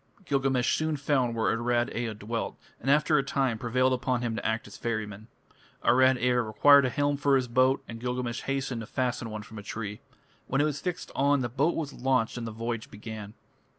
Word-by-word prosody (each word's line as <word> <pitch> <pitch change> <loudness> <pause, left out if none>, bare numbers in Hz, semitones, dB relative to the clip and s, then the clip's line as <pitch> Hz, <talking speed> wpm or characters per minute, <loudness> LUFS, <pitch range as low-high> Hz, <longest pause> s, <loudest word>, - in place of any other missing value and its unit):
Gilgamesh 135 -4 +1
soon 155 -1 -1
found 130 -4 +1
where 110 -1 +1
Arad 120 +1 0
Ea 115 -2 -2
dwelt, 110 +2 -4 0.2
and 135 - -3
after 150 +1 +4
a - - 0
time 135 -4 0
prevailed 130 +2 +2
upon 125 -1 -1
him 115 -2 -1
to - - -4
act 110 +1 -1
as 100 - -11
ferryman. 110 -2 -4 0.6
Arad 130 +1 +5
Ea 125 0 +2
required 130 +5 +5
a - - +1
helm 145 +3 0
for 140 0 +3
his 130 -2 +1
boat, 130 +3 +3
and 115 0 -7
Gilgamesh 125 0 -3
hastened 135 -3 -2
to 110 - -8
fashion 125 -3 -2
one 110 -1 -6
from 110 0 -10
a - - -7
tree. 105 0 -6 0.5
When 135 - 0
it - - +4
was 145 -2 -2
fixed 180 -1 -4
on, 140 0 +2
the 120 - -2
boat 140 +8 +1
was 150 -3 -3
launched 130 -3 +1
and 120 -2 -4
the - - -5
voyage 115 +1 -4
began. 105 0 -8
125 Hz, 210 wpm, -28 LUFS, 115-135 Hz, 0.6 s, Arad